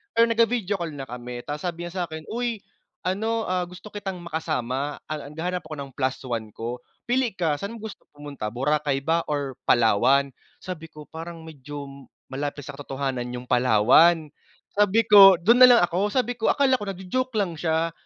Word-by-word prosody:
pero 230 - +6
nag-vi-video 230 -3 +1
call 165 -3 -4
na 135 - -6
kami, 125 -1 -7
tapos 150 +4 -4
sabi 170 0 -5
niya 175 0 -3
sakin, 160 0 -8
"Uy, 235 -3 -3 0.4
ano, 220 +5 -1
ah, 180 -2 -1
gusto 180 +4 -12
kitang 195 -4 -6
makasama, 145 -4 -3
ah, 155 -1 -5
naghahanap 170 +5 -3
ako 155 - -6
ng 140 -2 -7
plus 130 0 -1
one 115 -4 -3
ko. 120 +2 -5 0.2
Pili 245 -4 0
ka, 155 -4 0
sa'n 200 +3 -5
mo 225 - -11
gusto 220 -2 -9
pumunta, 145 -7 -6
Boracay 135 +3 -1
ba 165 +3 +2
or 140 -3 -3
Palawan?" 125 +5 +4 0.3
Sabi 170 -3 -6
ko, 155 -1 -12
"Parang 165 0 -8
medyo 140 -2 -9 0.2
malapit 145 +1 -4
sa - - -7
katotohanan 135 -3 -4
yung 125 - -6
Palawan," 130 +7 +4 0.4
sabi 205 +2 +3
ko, 200 -3 +9
"dun 215 +9 +3
nalang 245 -6 +8
ako." 180 +4 +1
Sabi 245 +2 -1
ko, 225 - 0
akala 265 -2 +3
ko 205 - -6
nagjo-joke 195 +7 -3
lang 180 -7 -1
siya, 165 0 0
165 Hz, 175 wpm, -24 LUFS, 140-200 Hz, 0.4 s, ko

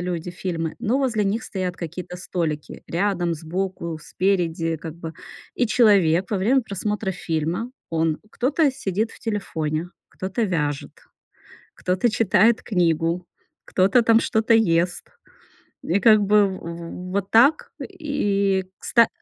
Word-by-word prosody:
люди 175 -1 -3
фильмы, 170 -3 -3
но 235 +2 0
возле 240 -6 +1
них 205 +3 0
стоят 185 -2 -3
какие-то 180 +1 -6
столики: 165 -5 -4
рядом, 175 -2 0
сбоку, 170 0 -4
спереди, 165 -3 0
как 160 -1 -7
бы. 165 -1 -7 0.4
И 245 - +1
человек 195 -7 +4
во 205 - 0
время 245 +7 +3
просмотра 210 0 -3
фильма, 165 +8 -2 0.2
он- 160 -1 0
кто-то 285 +4 +2
сидит 215 -1 -2
в - - -14
телефоне, 170 -7 -3 0.2
кто-то 190 +5 -3
вяжет, 150 -7 -2 0.8
кто-то 185 +6 0
читает 225 +2 +3
книгу, 170 -2 +1 0.4
кто-то 195 +6 +3
там 225 0 +5
что-то 220 0 +1
ест. 175 -5 +2 0.8
И, 185 +4 +1
как 215 +1 +6
бы, 205 0 +4
в 190 -1 -6
в 170 +2 -7
вот 195 0 -1
так, 260 +8 +4 0.2
и 205 - 0
кста 230 -2 +2
185 Hz, 130 wpm, -23 LUFS, 170-220 Hz, 0.8 s, как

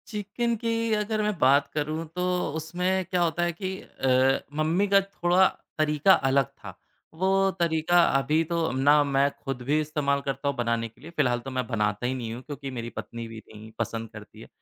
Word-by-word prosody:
Chicken 220 +3 -2
की 230 -1 0
अगर 215 0 0
मैं 210 -2 -1
बात 140 +2 +4
करूँ, 155 +2 -2
तो 180 -2 0
उसमें 180 +4 -1
क्या 180 0 -1
होता 175 0 +1
है 175 - +1
कि 190 +2 -5
अ, 130 0 +2 0.2
मम्मी 165 +6 +1
का 200 0 +5
थोड़ा 190 -1 +2 0.3
तरीका 155 +4 +4 0.2
अलग 135 0 +3
था। - - -13 0.4
वो 180 +4 -1 0.3
तरीका 170 +1 +3 0.2
अभी 150 +4 +1
तो 170 -1 0
ना 145 +3 +4
मैं 140 0 +2
खुद 135 -3 -4
भी 145 +5 +1
इस्तेमाल 145 -2 0
करता 135 +1 -3
हूँ 140 - 0
बनाने 115 -1 0
के 115 - -22
लिए, 160 - -10
फिलहाल 125 -5 +2
तो 135 +3 -8
मैं 130 -1 -2
बनाता 105 -1 -1
ही 125 - 0
नहीं 115 -3 -4
हूँ, 120 - -7
क्योंकि 140 0 -7
मेरी 120 -2 -5
पत्नी 115 -1 -7
भी 115 -1 -9
नहीं 110 +1 -12
पसंद 115 -1 -3
करती 105 -1 -12
है, - - -11
150 Hz, 195 wpm, -26 LUFS, 130-180 Hz, 0.4 s, का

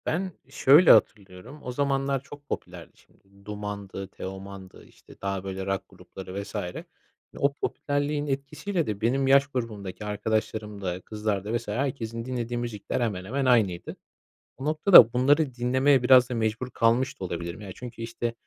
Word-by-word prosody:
Ben 185 +4 -1 0.2
şöyle 140 +5 +6
hatırlıyorum 100 +7 +1
o 125 - -4
zamanlar 135 0 0
çok 145 +1 -13
popülerdi - - -6
şimdi 100 0 -25
Duman'dı, 105 -2 -6
Teoman'dı 95 0 -9
işte - - -18
daha 100 -1 -3
böyle 95 0 -5
rock 95 -1 -2
grupları 95 +1 -8
vs. 100 - -12 0.8
O 140 0 +2
popülerliğin 145 +1 -2
etkisiyle 145 +6 -2
de 105 -1 -4
benim 135 +4 +1
yaş 140 +1 +5
grubumdaki 110 -7 -5
arkadaşlarımda, 105 -3 -3
kızlarda 105 +1 -2
vs. 115 - -10
herkesin 115 -1 -3
dinlediği 120 -2 -3
müzikler 120 0 -3
hemen 100 -6 -2
hemen 135 +6 -2
aynıydı. 110 -9 +2 0.6
O 135 - -7
noktada 155 - +7
bunları 140 +3 +3
dinlemeye 130 +2 +3
biraz 125 -1 +6
da - - -3
mecbur 110 +2 -1
kalmış 115 +3 +1
da - - -6
olabilirim. 85 +2 -5
Ya 100 -2 -8
çünkü 120 -2 -9
işte, 115 0 -3
115 Hz, 145 wpm, -26 LUFS, 100-135 Hz, 0.8 s, noktada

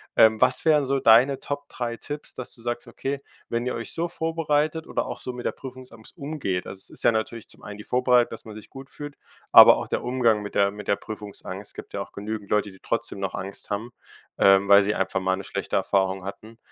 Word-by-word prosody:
ähm, 110 -1 +5
was 130 - +3
wären 150 -3 +4
so 135 +1 +1
deine 125 +4 +5
Top 145 0 -5
3 120 -2 -4
Tipps, 145 +4 -7
dass 125 - -8
du 115 - -17
sagst: 120 0 -3
„Okay, 135 +3 -4 0.3
wenn 120 +1 -1
ihr - - -1
euch 115 -1 -6
so 170 +1 -1
vorbereitet 160 -1 -1
oder - - -1
auch - - -6
so 125 - -5
mit 125 -1 -8
der - - +1
Prüfungsangst 130 -3 -12
umgeht,“ 140 - -3
also 95 - -8
es - - -12
ist - - -8
ja - - +6
natürlich 110 0 -3
zum - - -14
einen 105 0 -8
die 105 - -9
Vorbereitung, 125 0 +3
dass 115 - -9
man 110 -2 -9
sich 110 - -12
gut 135 0 -10
fühlt, 145 0 -8 0.4
aber - - +10
auch - - -4
der - - -2
Umgang 120 -4 +2
mit 105 - -8
der 100 0 +3
mit 105 +1 -9
der 100 - +3
Prüfungsangst. 105 -2 -8
Es - - -12
gibt - - -10
ja - - -2
auch - - -8
genügend 105 0 -5
Leute, 105 -1 +1
die 95 - -17
trotzdem 115 -3 -3
noch 95 -1 -3
Angst 95 +1 -7
haben, 110 +4 -3 0.5
ähm, 95 0 +6
weil 100 0 +9
sie 105 +2 0
einfach 95 0 0
mal 95 0 +1
'ne 95 - -6
schlechte - - -4
Erfahrung 95 -1 +1
hatten. 110 +3 -9
115 Hz, 240 wpm, -25 LUFS, 100-130 Hz, 0.5 s, aber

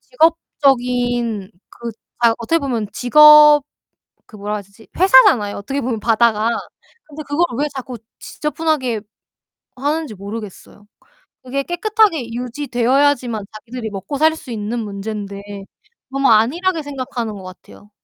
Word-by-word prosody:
직업적인 245 - 0 0.2
그 235 0 -8 0.3
아 235 -1 +5
어떻게 280 +8 0
보면 245 -8 -2
직업 300 +3 +7 0.7
그 215 - -16
뭐라 210 +1 -4
해야 210 - -4
되지? 200 +3 -20
회사잖아요 260 - +5
어떻게 270 +8 -4
보면 240 -4 -2
바다가. 225 0 +2 0.6
근데 310 0 -9
그걸 310 +5 +1
왜 300 - +1
자꾸 255 -2 -6 0.2
지저분하게 300 -7 -2 0.7
하는지 290 -1 -2
모르겠어요. 205 0 -9 0.6
그게 270 +2 -2
깨끗하게 350 - +1
유지되어야지만 250 -1 0
자기들이 225 +1 -7
먹고 200 +8 -5
살 315 +2 +4
수 280 - -11
있는 220 +1 -4
문제인데 200 -1 -6 0.7
너무 275 0 +1
안일하게 320 +11 +2
생각하는 255 -6 -5
거 195 - -10
같아요. 185 +2 -14
245 Hz, 315 characters per minute, -18 LUFS, 215-295 Hz, 0.7 s, 직업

